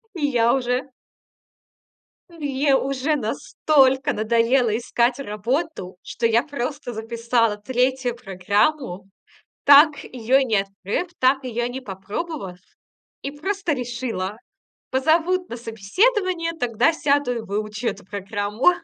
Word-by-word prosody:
и 310 -4 -1
я 240 -4 +3
уже 255 +1 -1 1.4
мне 285 -4 0
уже 275 +3 0
настолько 265 +2 +2
надоело 230 +2 +2
искать 240 +1 0
работу, 230 - -3
что 230 - -2
я 230 +1 +3
просто 280 -3 -5
записала 230 0 0
3 250 +2 0
программу, 200 +1 0 0.6
так 285 0 +7
её 250 +1 +1
и 275 - +2
не 225 -4 +1
открыв, 195 - -3
так 265 +2 +3
её 240 -2 -2
не 245 +2 -4
и 260 - -13
попробовав, 195 - -5 0.6
и 275 - -4
просто 385 +3 -2
решила: 235 -6 -3 0.5
"Позовут 330 +7 +2
на 235 - -6
собеседование, 335 - 0
тогда 240 +4 +2
сяду 285 -5 +1
и - - -2
выучу 210 +2 -4
эту - - -3
программу". 205 - 0
250 Hz, 120 wpm, -22 LUFS, 220-285 Hz, 1.4 s, так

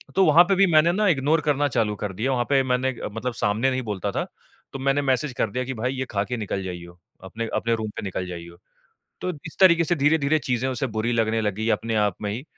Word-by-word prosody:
तो 190 - +5
वहाँ 160 +3 +7
पे 195 +2 +2
भी 195 +1 +5
मैंने 155 +2 +5
ना 210 +4 +1
इग्नोर 155 -1 +2
करना 145 -1 +1
चालू 115 -5 0
कर 100 0 -5
दिया 115 +8 -1
वहाँ 120 -2 0
पे 140 -1 +4
मैंने 130 0 0 0.2
मतलब 120 +3 -4
सामने 110 +4 +1
नहीं 130 0 -1
बोलता 105 -6 -3
था - - -2 0.5
तो 135 - -5
मैंने 135 +2 +1
मैसेज 135 0 0
कर 110 - +1
दिया 125 +4 -2
कि 130 - -4
भाई 125 +2 -2
ये 130 -1 -3
ख़ा 100 -2 0
के 125 +3 -4
निकल 100 -3 -3
जाइयो। 90 -1 -8 0.2
अपने 110 +5 -5
अपने 115 0 +1
रूम 110 -1 -4
पे - - -5
निकल 95 -2 -3
जाइयो। 85 -1 -9 0.6
तो 185 - -2 0.2
इस 155 - -13
तरीक़े 170 -3 +6
से 175 +2 0
धीरे-धीरे 150 0 +2
चीजें 125 -1 -1
उसे 130 0 -2
बुरी 110 +2 0
लगने 115 -1 +1
लगी 105 +1 -1
अपने 115 0 -3
आप 105 -3 +1
में 105 -1 -2
ही 115 +5 -5
125 Hz, 245 wpm, -24 LUFS, 105-140 Hz, 0.6 s, वहाँ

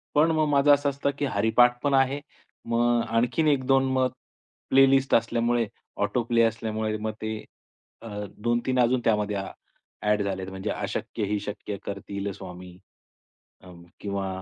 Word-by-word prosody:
पण 155 +3 +5
मग 155 -1 +2
माझं 145 0 +5
असं 145 0 +2
असतं, 140 +1 -1
की 145 - +1
हरिपाठ 120 +1 +3
पण 145 -1 +1
आहे. 135 +1 +3 0.5
मग 120 0 +2
आणखीन 120 +8 +1
1-2 135 -2 +3
मग 130 -1 +2 0.6
प्लेलिस्ट 135 0 +4
असल्यामुळे 115 0 +1 0.4
ऑटो 125 - 0
प्ले 115 0 +3
असल्यामुळे 110 -1 -1
मग 110 +1 -3
ते 110 0 -2 0.7
अ, 115 - -9 0.3
2-3 120 +3 0
अजून 125 +1 +3
त्यामध्ये 105 -2 +1
अ, 95 0 -4 0.5
ॲड 105 0 +2
झाले 95 -1 -2
आहेत, 95 0 -6
म्हणजे 95 0 -5
अशक्य - - -4
ही 105 +1 -1
शक्य 105 0 -5
करतील 100 0 -4
स्वामी, 90 -1 -10 0.8
अ, 95 - -15 0.3
किंवा 100 -1 -3
115 Hz, 150 wpm, -26 LUFS, 105-135 Hz, 0.8 s, पण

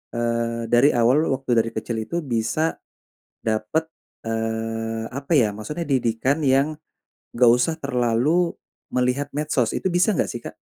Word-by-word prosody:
eee, 115 0 -1
dari 120 +5 +5
awal 125 +7 +3
waktu 130 -2 0
dari 115 - 0
kecil 115 - -3
itu 170 +9 -3
bisa 130 +6 0 0.7
dapat, 115 +9 0 0.4
eee, 115 0 -2
apa 140 +4 -4
ya, 110 -6 +3
maksudnya 150 +10 -5
didikan 130 +3 +1
yang 135 +3 +3 0.6
enggak 120 0 +6
usah 140 +6 +1
terlalu 140 +6 +1 0.4
melihat 125 +3 0
medsos. 145 -5 0
Itu 190 - -1
bisa 180 +4 +4
enggak, - - 0
sih, 120 - -4
Kak? - - -7
125 Hz, 140 wpm, -23 LUFS, 115-145 Hz, 0.7 s, enggak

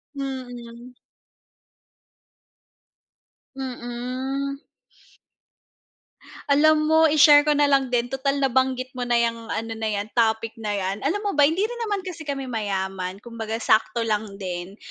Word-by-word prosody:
Mm. 245 -3 -7 2.6
Mm. 260 +2 -4 1.9
Alam 305 +2 +4
mo 320 +1 +5
i-share 295 -1 +7
ko 295 0 +1
na 290 - +5
lang 275 -2 +2
din 245 -1 +1
tutal 270 +2 -1
nabanggit 260 -1 0
mo 255 - -6
na 240 -1 +1
'yang 230 -1 -1
ano 225 0 -3
na 220 0 -3
'yan, 205 -1 -2
topic 225 0 +1
na 205 -1 -2
'yan, 195 +1 -3
alam 320 +9 0
mo 405 - 0
ba 295 - +3
hindi 325 +8 +3
rin 480 +2 -6
naman 400 -2 -2
kasi 350 -3 -7
kami 280 -3 -4
mayaman 190 -5 -3
kumbaga 225 0 -5
sakto 230 +1 +2
lang 210 -2 -2
din. 185 +1 -6
245 Hz, 135 wpm, -24 LUFS, 225-280 Hz, 2.6 s, i-share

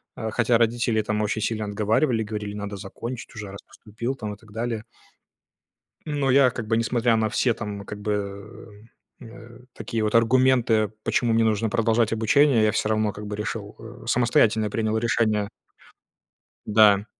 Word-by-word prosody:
а, 110 0 -4
хотя 120 +1 +2
родители, 115 -1 +1
там, 105 0 -1
очень 105 +1 -1
сильно 110 0 -2
отговаривали, 110 +4 +1
говорили: 105 -1 -5
"Надо 100 0 -5
закончить 115 +5 -7
уже, 105 -2 -7
раз 100 - -10
поступил", 115 +5 -6
там, 105 -5 -5
и - - -11
так 110 -1 -19
далее. 115 0 -3 1.2
Но 145 -3 0
я, 130 -1 +5
как 120 -2 -6
бы, 115 - +2
несмотря 115 0 +1
на 110 -1 +1
все, 120 +3 +1
там, 105 -3 -6
как 105 +1 -8
бы, 105 0 -2 1.1
м, 120 - -11
э, 115 +1 -13
такие 115 -1 -3
вот 105 - -1
аргументы, 115 -2 +3
почему 120 0 +1
мне 115 - +3
нужно 110 0 +1
продолжать 115 +1 +1
обучение, 115 +2 +3
я 110 - +4
всё 105 - -1
равно, 110 -1 +1
как 105 0 -8
бы, 105 - -5
решил, 105 -1 -5
э, 115 +2 -11
самостоятельно 110 -3 +2
принял 110 0 -1
решение. 110 -3 +1 1.2
Да. 105 -1 +5
110 Hz, 165 wpm, -24 LUFS, 105-115 Hz, 1.2 s, я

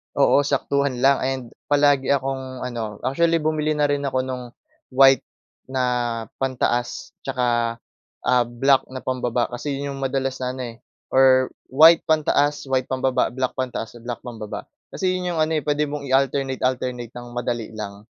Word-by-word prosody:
Oo, 140 0 +4
saktuhan 140 -2 0
lang 135 +1 +5
and 130 -1 -1 0.2
palagi 145 -2 +3
akong 130 -1 -3
ano, 115 -4 -5
actually, 165 +5 +2
bumili 155 0 0
na 150 -1 +1
rin 145 0 0
ako 130 -1 0
no’ng 130 -1 -5 0.5
white 135 0 +6 0.4
na 130 -1 -1 0.5
pantaas, 130 +4 -2
'tsaka, 120 -3 0 0.4
ah, 125 -1 +3
black 130 +3 +2
na 130 - -5
pambaba. 125 -2 -1
Kasi 140 +4 -4
'yon 140 0 -4
'yong 135 - -5
madalas 135 0 -1
na 125 0 -3
ano, 130 - -6
eh, 115 - -12 0.3
or 130 -1 +5 0.2
white 160 +4 +7
pantaas, 145 -2 +1
white 130 -1 +1
pambaba, 130 -2 0
black 130 +1 -2
pantaas, 120 -2 -4
black 120 -2 -5
pambaba. 105 -4 -7 0.2
Kasi 185 -1 0
'yon 180 -1 -2
'yong 165 - -2
ano, 155 - +1
eh, 150 - -3
puwede 150 0 +1
mong 145 -1 -5
i-alternate-alternate 130 -2 0
ng 120 - -8
madali 120 -2 -3
lang. 105 -1 -7
130 Hz, 160 wpm, -23 LUFS, 125-140 Hz, 0.5 s, white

